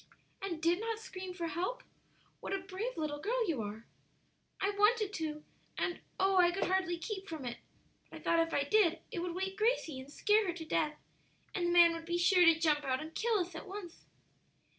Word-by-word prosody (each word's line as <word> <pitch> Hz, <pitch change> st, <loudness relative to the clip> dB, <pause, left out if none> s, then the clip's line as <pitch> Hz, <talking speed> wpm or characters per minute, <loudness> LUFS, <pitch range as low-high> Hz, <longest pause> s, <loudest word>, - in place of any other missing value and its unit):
"And 365 Hz, -5 st, -3 dB
did 340 Hz, +2 st, +3 dB
not 450 Hz, 0 st, -2 dB
scream 375 Hz, -4 st, -7 dB
for 345 Hz, -2 st, -3 dB
help! 370 Hz, +10 st, -3 dB, 0.6 s
What -, -, -4 dB
a -, -, +2 dB
brave 390 Hz, +6 st, -5 dB
little 300 Hz, -2 st, -2 dB
girl 460 Hz, +6 st, 0 dB
you 300 Hz, -9 st, 0 dB
are!" 215 Hz, +2 st, -6 dB, 0.7 s
"I 395 Hz, +1 st, +1 dB
wanted 415 Hz, 0 st, +3 dB
to, 305 Hz, -4 st, -4 dB, 0.3 s
and, 350 Hz, -, -1 dB, 0.2 s
oh, 385 Hz, 0 st, +3 dB
I 355 Hz, -1 st, +6 dB
could 350 Hz, +3 st, -1 dB
hardly 370 Hz, -2 st, +1 dB
keep 390 Hz, +3 st, -5 dB
from 315 Hz, -5 st, -5 dB
it! 240 Hz, -1 st, -5 dB, 0.5 s
But -, -, -9 dB
I -, -, -14 dB
thought 335 Hz, -, +3 dB
if 330 Hz, 0 st, +1 dB
I 285 Hz, -, +2 dB
did 345 Hz, +2 st, +3 dB
it -, -, -3 dB
would 345 Hz, 0 st, -3 dB
wake 385 Hz, +1 st, -3 dB
Gracie 425 Hz, -, +1 dB
and 265 Hz, +2 st, -10 dB
scare 420 Hz, +5 st, +3 dB
her 350 Hz, -, 0 dB
to 330 Hz, -1 st, -7 dB
death, 305 Hz, -1 st, 0 dB, 0.6 s
and 350 Hz, -2 st, 0 dB
the -, -, +1 dB
man 345 Hz, -1 st, +7 dB
would 330 Hz, 0 st, -6 dB
be 345 Hz, +1 st, -1 dB
sure 360 Hz, +1 st, +5 dB
to 330 Hz, -1 st, +6 dB
jump 305 Hz, -3 st, +2 dB
out 260 Hz, -2 st, 0 dB
and 315 Hz, +1 st, -7 dB
kill 455 Hz, +3 st, +1 dB
us 355 Hz, +1 st, -4 dB
at -, -, -8 dB
once." 380 Hz, -3 st, -9 dB
350 Hz, 215 wpm, -33 LUFS, 320-390 Hz, 0.7 s, man